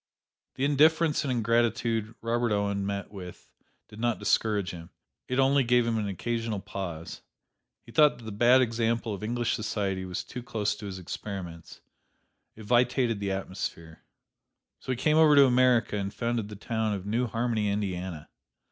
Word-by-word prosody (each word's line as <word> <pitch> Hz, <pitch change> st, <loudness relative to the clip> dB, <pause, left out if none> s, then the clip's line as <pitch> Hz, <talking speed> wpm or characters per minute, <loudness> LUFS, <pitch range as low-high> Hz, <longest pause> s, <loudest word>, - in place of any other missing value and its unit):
The 135 Hz, -, 0 dB
indifference 155 Hz, +2 st, +3 dB
and 140 Hz, -, -1 dB
ingratitude 115 Hz, -1 st, 0 dB
Robert 115 Hz, 0 st, 0 dB
Owen 100 Hz, -1 st, 0 dB
met 100 Hz, 0 st, -4 dB
with 90 Hz, -3 st, -10 dB, 0.4 s
did 105 Hz, 0 st, -13 dB
not 120 Hz, 0 st, +1 dB
discourage 105 Hz, -5 st, +1 dB
him: 85 Hz, -1 st, -10 dB, 0.4 s
it 130 Hz, -, -2 dB
only 135 Hz, +1 st, +4 dB
gave 120 Hz, 0 st, +3 dB
him 115 Hz, -1 st, 0 dB
an 105 Hz, -, -2 dB
occasional 115 Hz, +2 st, -2 dB
pause. 85 Hz, -4 st, -6 dB, 0.6 s
He 115 Hz, -, -14 dB
thought 150 Hz, +3 st, +5 dB
that 120 Hz, -, -14 dB
the 110 Hz, -, -6 dB
bad 120 Hz, +5 st, +5 dB
example 115 Hz, -1 st, -1 dB
of 100 Hz, -, -6 dB
English 120 Hz, +2 st, -1 dB
society 100 Hz, -3 st, -2 dB
was 90 Hz, -1 st, -4 dB
too 125 Hz, -, -7 dB
close 110 Hz, -3 st, -1 dB
to 105 Hz, -, -7 dB
his 95 Hz, -1 st, -6 dB
experiments: 90 Hz, -2 st, -7 dB, 0.7 s
it 110 Hz, -, -11 dB
vitiated 120 Hz, -1 st, +2 dB
the 100 Hz, -1 st, -2 dB
atmosphere. 90 Hz, -4 st, -5 dB, 0.8 s
So -, -, -5 dB
he -, -, +1 dB
came 150 Hz, +5 st, +2 dB
over 155 Hz, -2 st, +6 dB
to 140 Hz, -1 st, +8 dB
America 125 Hz, -4 st, +3 dB
and 100 Hz, -1 st, -3 dB
founded 115 Hz, -2 st, -2 dB
the 105 Hz, -, -8 dB
town 110 Hz, 0 st, -2 dB
of 95 Hz, -1 st, -7 dB
New 115 Hz, +4 st, 0 dB
Harmony, 115 Hz, -2 st, -1 dB
Indiana. 95 Hz, -5 st, -3 dB
110 Hz, 165 wpm, -28 LUFS, 100-120 Hz, 0.8 s, to